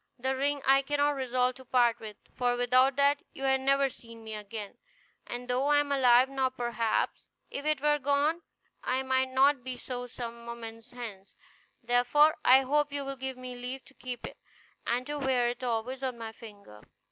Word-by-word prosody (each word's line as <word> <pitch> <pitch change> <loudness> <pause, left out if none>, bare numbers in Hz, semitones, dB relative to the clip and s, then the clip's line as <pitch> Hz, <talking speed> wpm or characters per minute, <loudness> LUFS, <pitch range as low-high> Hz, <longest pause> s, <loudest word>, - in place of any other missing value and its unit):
The 265 +2 -1
ring 285 +1 -1
I 270 +1 +5
cannot 290 +1 +1
resolve 255 -2 0
to 260 - -14
part 240 -2 +3
with; 215 -2 -9 0.2
for 245 -1 +1
without 255 +2 +4
that 285 +1 +3
you 270 - -8
had 265 0 +2
never 275 +1 +3
seen 230 -3 -12
me 220 0 -7
again; 210 -1 -7 0.5
and 245 +1 -6
though 250 +3 +1
I 295 0 +4
am 290 -1 +1
alive 255 -2 +5
now, 265 -1 0
perhaps, 240 -3 -2 0.2
if 285 +2 -4
it 305 -3 +1
were 295 0 +3
gone, 285 +4 +1 0.4
I 260 +1 0
might 260 0 +1
not 265 0 +3
be 255 -1 -5
so 245 -1 -6
some 235 -1 -7
moments 230 0 -8
hence; 220 -6 -9 0.5
therefore, 245 +6 +4
I 260 +1 +7
hope 290 +2 +1
you 285 -1 -3
will 275 0 -4
give 265 -1 -5
me 255 0 -7
leave 250 +2 -6
to 275 - -18
keep 250 -3 -7
it, - - -9 0.5
and 245 +2 0
to 295 +1 -4
wear 255 -3 +2
it 245 +1 -6
always 245 +2 -2
on 255 -2 -3
my 225 -1 -6
finger." 205 - -13
255 Hz, 195 wpm, -29 LUFS, 240-275 Hz, 0.5 s, I